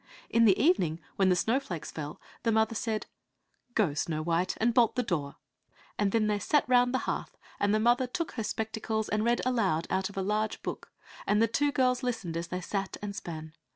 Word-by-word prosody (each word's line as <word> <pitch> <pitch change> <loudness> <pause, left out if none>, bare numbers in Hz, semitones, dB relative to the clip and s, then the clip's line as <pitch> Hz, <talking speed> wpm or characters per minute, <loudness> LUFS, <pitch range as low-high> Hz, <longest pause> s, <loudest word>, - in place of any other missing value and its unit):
In 230 0 +5
the 200 -2 +5
evening, 195 - +3 0.2
when 195 -1 +3
the 180 - +4
snowflakes 200 - -1
fell, 150 -1 -6 0.2
the 230 - +1
mother 220 +1 +2
said, 220 0 -2 0.7
"Go, 195 -10 +2
Snow 155 +1 -2
white, 170 +2 0
and 230 +1 +2
bolt 235 -1 +4
the 250 - +1
door," 150 -9 -2 0.6
and 205 -1 +1
then 225 0 +2
they 210 -1 +1
sat 290 +8 +2
round 245 0 +4
the 260 - +2
hearth, - - -3 0.2
and 205 0 +2
the 215 - +3
mother 240 +3 +3
took 335 +6 -3
her 225 - -4
spectacles 220 0 -2
and 215 0 +1
read 235 +1 +2
aloud 200 -10 +1
out 190 +1 0
of 200 - -12
a 190 - 0
large 215 +2 -1
book, - - -6 0.4
and 210 - +3
the 230 - +4
two 285 +6 +1
girls 255 -2 +2
listened 225 -10 -3
as 170 0 -3
they 180 0 -4
sat 195 +2 -3
and 200 -1 -4
span. 160 -3 -7
215 Hz, 210 wpm, -29 LUFS, 180-240 Hz, 0.7 s, In